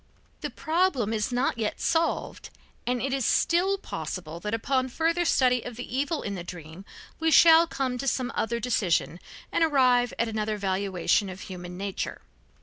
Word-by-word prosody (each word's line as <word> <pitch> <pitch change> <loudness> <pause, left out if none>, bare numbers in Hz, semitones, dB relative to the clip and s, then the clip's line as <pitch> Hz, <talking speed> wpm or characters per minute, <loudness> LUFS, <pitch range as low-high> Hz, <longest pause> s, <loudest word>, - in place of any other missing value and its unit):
The - - -4
problem 315 - 0
is 215 +3 -1
not 245 0 0
yet 215 -2 -2
solved, 330 0 -1 0.4
and 250 0 +1
it 265 +2 -2
is 270 -1 0
still 365 - +2
possible 170 - -6
that 210 +4 -4
upon 260 +3 0
further 335 +6 0
study 250 -5 +3
of 245 0 -8
the 245 +1 -6
evil 290 +4 -1
in 200 - -3
the 180 -3 -5
dream 175 +1 -10 0.3
we 325 0 +2
shall 325 +1 +7
come 260 -5 -2
to 275 - -3
some 255 -1 0
other 235 +1 -1
decision 195 -7 0 0.3
and - - +2
arrive 255 -5 +3
at 235 - +1
another 215 -1 -2
valuation 195 0 0
of 185 +1 -8
human 180 -1 -8
nature. 195 0 -4
245 Hz, 170 wpm, -27 LUFS, 200-275 Hz, 0.4 s, shall